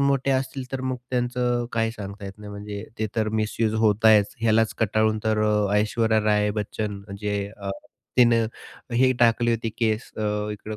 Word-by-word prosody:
मोठे 140 -1 +2
असतील 130 0 -1
तर 135 - -2
मग 130 -1 -2
त्यांचं 125 -1 0
काही 115 -1 +1
सांगता 100 -1 -8
येत 100 +1 -8
नाही, 105 -1 -9
म्हणजे 100 0 -6
ते 110 - 0
तर 110 -1 +1
मिस 105 0 -3
युज 110 -1 +2
होतायच. 105 0 +4
यालाच 110 -1 +3
कंटाळून 110 0 +2
तर 110 -1 +2
अ, 105 -1 +2
ऐश्वर्या 110 +1 +2
राय 105 -1 +3
बच्चन 105 0 -4
अ, - - -18
म्हणजे 100 0 -3 0.8
तिने 115 -2 +5 0.5
हे 130 +1 +5
टाकली 120 0 +4
होती 115 -1 -1
केस 110 -1 0
अ, 105 -1 -1
इकडं 105 +1 -7
110 Hz, 175 wpm, -24 LUFS, 105-120 Hz, 0.8 s, तिने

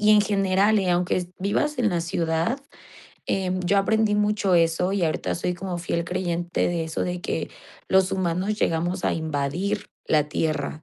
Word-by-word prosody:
y 210 0 +4
en 210 - +7
general, 200 +1 +2
eh, 185 -2 +1
aunque 180 0 +1
vivas 295 +10 0
en 230 - +3
la 175 -2 0
ciudad, 165 +8 -1 0.7
em, 185 -1 0
yo 200 +3 +2
aprendí 220 +1 +2
mucho 210 -2 +2
eso, 170 +3 +2
y 200 - 0
ahorita 160 -2 0
soy 180 +1 -2
como 180 -1 -4
fiel 170 -1 -2
creyente 175 -1 -1
de 170 -2 -1
eso 160 - -3
de 180 0 -3
que 160 - -2 0.4
los 190 0 +3
humanos 190 +3 -1
llegamos 175 +3 0
a - - +1
invadir 160 +4 -2 0.2
la 150 -1 +2
tierra. 155 -1 -2
180 Hz, 170 wpm, -24 LUFS, 165-195 Hz, 0.7 s, en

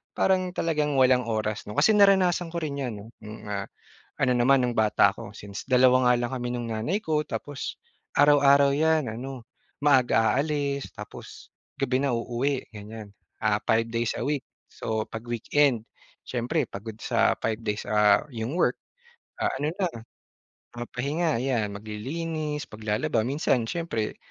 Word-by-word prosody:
parang 185 -1 +2
talagang 150 -3 0
walang 125 -1 +4
oras 110 -2 -2
'no. 105 - -6
Kasi 220 - +5
naranasan 185 -4 +4
ko 170 - -1
rin 145 -2 -3
'yan 125 -4 -2
'no, 100 - -10 0.2
noong, 105 +1 -9
ah, 100 -1 -2 0.6
ano 125 -2 +3
naman 130 +2 +4
nung 120 -1 -1
bata 110 -1 +4
ako - - -9
since 100 0 -7
dalawa 130 0 +5
nga - - +6
lang 120 - -7
kami 125 -1 -3
nung 120 -1 -3
nanay 135 - -1
ko. 155 -6 0
Tapos, 145 -2 -5 0.4
araw-araw 140 -1 +6
'yan 160 -1 +2
ano, 125 +1 -7 0.4
maaga 125 -5 +4
aalis 140 -1 -1
tapos - - -10 0.3
gabi 130 0 +1
na 140 - +1
uuwi 125 +4 -2
ganiyan. 105 0 -9 0.3
Ah, 105 -1 +1
5 115 0 +2
days 115 0 0
a - - -2
week 145 -1 0 0.2
so 110 -1 -3
'pag 110 0 -7
weekend 120 0 +1 0.4
siyempre 120 -1 -1
pagod 110 +2 -8
sa - - +2
5 110 0 -1
days, 105 0 -3
ah, 105 -1 +4
'yong 115 +2 -4
work. - - +2 0.6
Ah, - - +1
ano 150 +2 0
na, 190 -3 +1 0.9
papahinga 140 +6 -2
'yan, 120 -6 0
maglilinis, 150 +9 -4
maglalaba. 110 +1 -1
Minsan 130 -3 +1
siyempre, 165 -11 -3
125 Hz, 155 wpm, -26 LUFS, 110-145 Hz, 0.9 s, nga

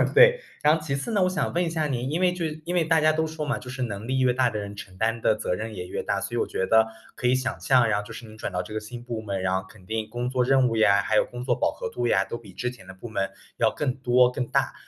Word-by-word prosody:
对， - - +8 0.2
然 150 +1 +6
后 160 - -4
其 145 -3 -2
次 140 +12 -3
呢， 205 -3 +2
我 185 - +3
想 185 - -1
问 175 - +2
一 170 - -1
下 160 -2 -1
您， 130 -1 -2
因 165 +4 -1
为 180 -1 +4
就 175 -2 -3
是 155 0 -5
因 175 - -3
为 175 -2 +2
大 160 0 +3
家 155 0 +5
都 160 0 0
说 155 -1 -4
嘛， 145 - -1
就 125 - -10
是 130 +1 -5
能 110 -2 -5
力 130 +1 0
越 130 -1 +4
大 125 -1 +3
的 110 - -4
人 100 0 -6
承 95 -3 -10
担 115 +2 0
的 110 - +3
责 100 - -2
任 110 +3 -4
也 90 -2 -5
越 - - -3
大。 - - -1
所 - - -5
以 - - 0
我 - - 0
觉 95 - -1
得 110 +1 +5 0.3
可 125 - -1
以 125 - +4
想 130 -1 -2
象 125 -3 +4
然 105 -1 +2
后 105 - -6
就 - - -9
是 120 - -9
你 110 0 -13
转 105 - -4
到 90 -1 -2
这 105 - -9
个 110 - -1
新 120 +3 -9
部 120 -3 -4
门， 100 -3 -3
然 95 0 0
后 95 0 -1
肯 100 -4 -17
定 110 +1 -3
工 120 +2 -3
作 125 -1 +1
任 130 -1 +4
务 115 - -1
呀， 100 -2 +5
还 110 +2 +1
有 - - +4
工 120 0 -7
作 - - +2
饱 - - +1
和 - - -5
度 120 0 -2
呀 - - +3
都 - - -5
比 - - -14
之 125 0 -2
前 120 -7 -15
的 95 - -9
部 95 +5 -9
门 95 -4 -1 0.3
要 115 - +4
更 135 -4 -1
多、 125 -1 +4
更 125 -1 -3
大。 - - +1
125 Hz, 360 characters per minute, -26 LUFS, 110-145 Hz, 0.3 s, 对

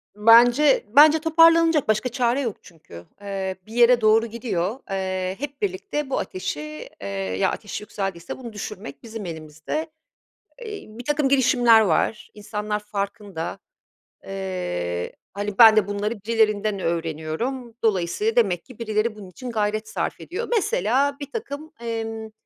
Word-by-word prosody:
Bence 240 +6 +6
bence 305 +2 +8
toparlanacak 330 -2 +5
başka 215 +3 +1
çare 245 +1 +1
yok 230 -6 -3
çünkü. 120 - -14 0.2
Eee, 195 -2 -3
bir 220 - -11
yere 240 0 +5
doğru 220 +1 +4
gidiyor, 225 -1 -3
eee, 185 -1 -2
hep 285 +2 -6
birlikte 375 -8 -2
bu - - 0
ateşi, 150 -5 -5
eee, 100 - -5
ya, 95 -1 -1
ateş 210 - -6
yükseldiyse 195 -4 -5
bunu 235 -4 -9
düşürmek 195 -9 -7
bizim 225 -3 -7
elimizde. 160 - -5 0.8
Eee, 425 -2 -7
birtakım 270 +6 -1
girişimler 245 -4 +5
var, 210 +2 0
insanlar 210 0 -4
farkında. 200 -4 -5 0.7
Iıı, 90 - -3 0.2
hani, 205 0 -4
ben 225 -2 +10
de 210 -2 +3
bunları 205 +2 -2
birilerinden 215 -3 +1
öğreniyorum, 170 - -3
dolayısıyla 220 - +1
demek 180 - +2
ki 255 -3 -15
birileri 215 0 -1
bunun 195 -3 -11
için 245 +6 -8
gayret 215 0 -1
sarf - - -3
ediyor. 445 +7 -5
Mesela 280 - +1
birtakım, 285 0 -5 0.2
ımm, 235 - -4
ııı, 225 -1 -4
215 Hz, 135 wpm, -23 LUFS, 190-255 Hz, 0.8 s, ben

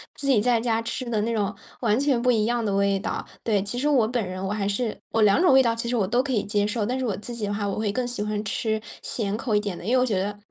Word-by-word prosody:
自 285 - -6
己 250 -7 +4
在 240 0 +3
家 230 -1 +1
吃 230 +3 -4
的 220 -2 0
那 230 +2 -1
种 205 -2 0 0.3
完 220 -3 +2
全 275 -4 +2
不 250 - +2
一 220 -3 +2
样 240 0 0
的 205 -2 0
味 200 0 +2
道。 - - -3 0.2
对， 210 -4 +2
其 205 +4 -5
实 290 - 0
我 255 -7 +4
本 240 -2 -1
人， 185 0 -5
我 - - -2
还 210 -2 -1
是 215 +2 -1
我 225 - +1
2 205 +9 +5
种 355 -7 +5
味 265 - +8
道， 230 -2 +2
其 230 +1 -4
实 245 - 0
我 210 -5 +2
都 240 +5 +2
可 275 - -3
以 215 - +1
接 205 0 0
受， 210 0 -1
但 250 +4 -1
是 260 - -1
我 210 - -1
自 225 +4 -7
己 220 -3 -3
的 205 - -2
话， 205 0 -2
我 200 - -2
会 215 -1 0
更 250 +4 -1
喜 240 -3 -4
欢 210 0 -2
吃， 220 +1 -1 0.2
咸 205 -3 -2
口 230 -1 -2
一 - - +5
点 200 -4 -4
的， - - -10
因 225 - -1
为 - - +5
我 - - +3
觉 205 -6 0
得 205 +1 -3
220 Hz, 345 characters per minute, -25 LUFS, 205-245 Hz, 0.3 s, 味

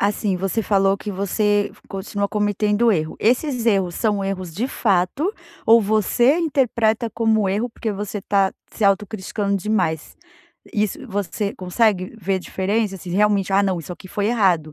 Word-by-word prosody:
assim, 200 -1 0
você 195 +4 -1
falou 195 -1 +2
que 210 - -6
você 205 +1 0 0.2
continua 200 +1 -3
cometendo 210 +2 +2
erro. 155 -4 -2
Esses 250 +1 +1
erros, 195 -5 +2
são 205 -3 0
erros 185 -3 -4
de 235 +8 -2
fato 215 - 0 0.3
ou 230 +1 +7
você 220 - +3
interpreta 235 -7 +1
como 220 -2 +1
erro, 210 +6 0
porque 230 -1 -4
você 205 +1 -4
está 195 -1 +1 0.2
se 215 - -2
autocriticando 200 0 0
demais? 180 -6 -1 0.6
Isso 210 -2 0
você 200 0 -2
consegue 185 +1 0
ver 190 +1 0
diferença 195 +3 -1
assim, 180 -1 -9
realmente: 200 0 +2
"Ah 195 +1 +4
não, 190 -3 0
isso 165 - -7
aqui 185 - -12
foi 200 +2 -1
errado, 185 -9 +2
205 Hz, 155 wpm, -21 LUFS, 190-220 Hz, 0.6 s, ou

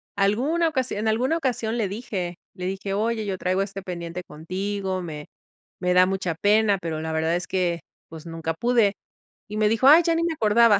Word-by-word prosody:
alguna 255 +13 +2
ocasión 260 -7 -2
en 220 - -1
alguna 250 +9 +2
ocasión 240 -6 -1
le 220 -4 +1
dije, 190 -4 -4 0.2
le 180 - -5
dije: 195 +1 -3
"Oye, 220 +2 0
yo 195 -2 -2
traigo 185 +1 0
este 195 0 -4
pendiente 175 -1 -5
contigo, 185 +4 -3
me 150 -4 -7 0.5
me 180 -1 +1
da 180 0 +6
mucha 190 -3 -1
pena, 205 +2 +3
pero 160 -2 -3
la 160 0 -3
verdad 160 +1 +1
es 175 - -2
que, 175 -3 0 0.3
pues, 160 0 -10
nunca 165 -1 -3
pude". 235 -2 +3 0.6
Y 210 - -4
me 215 -1 +3
dijo: 230 +4 +3
"Ay, 310 +4 +9
ya 335 0 +2
ni 335 - +1
me 335 -1 0
acordaba". 220 -4 +5
195 Hz, 200 wpm, -24 LUFS, 180-225 Hz, 0.6 s, Ay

